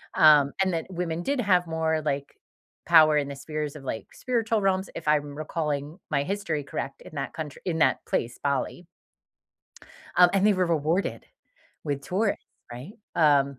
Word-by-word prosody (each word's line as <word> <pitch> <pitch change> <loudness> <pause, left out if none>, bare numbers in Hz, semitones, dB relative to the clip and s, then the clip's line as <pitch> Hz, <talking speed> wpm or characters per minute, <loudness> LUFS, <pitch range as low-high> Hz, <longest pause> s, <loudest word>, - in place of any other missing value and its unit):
Um, 150 -3 +6
and 190 -1 0
that 165 -1 -2
women 175 -2 -3
did 280 +4 -1
have 180 -5 +3
more, 160 -1 0
like, 140 -2 -2 0.5
power 155 -2 +7
in 145 -1 0
the 140 - -6
spheres 150 +1 -4
of, 140 - -12
like, 110 - -4
spiritual 230 -3 0
realms, 190 -1 +1
if - - -7
I'm 145 -1 +1
recalling 150 0 -3
my 140 -2 +1
history 170 -4 -2
correct 135 - -5
in - - -12
that 140 -1 -3
country 155 -3 -7
in 175 -3 -1
that 130 -5 +2
place- 120 0 -2
Bali. 140 +5 -1 1.3
Um, 180 0 +7
and 195 0 +3
they 210 - +5
were 185 -1 +1
rewarded 165 +3 0 0.6
with 140 -2 -2
tourists, 200 +8 -1 0.3
right? 125 +11 -8 0.2
Um, 140 -4 +3
155 Hz, 170 wpm, -26 LUFS, 145-180 Hz, 1.3 s, power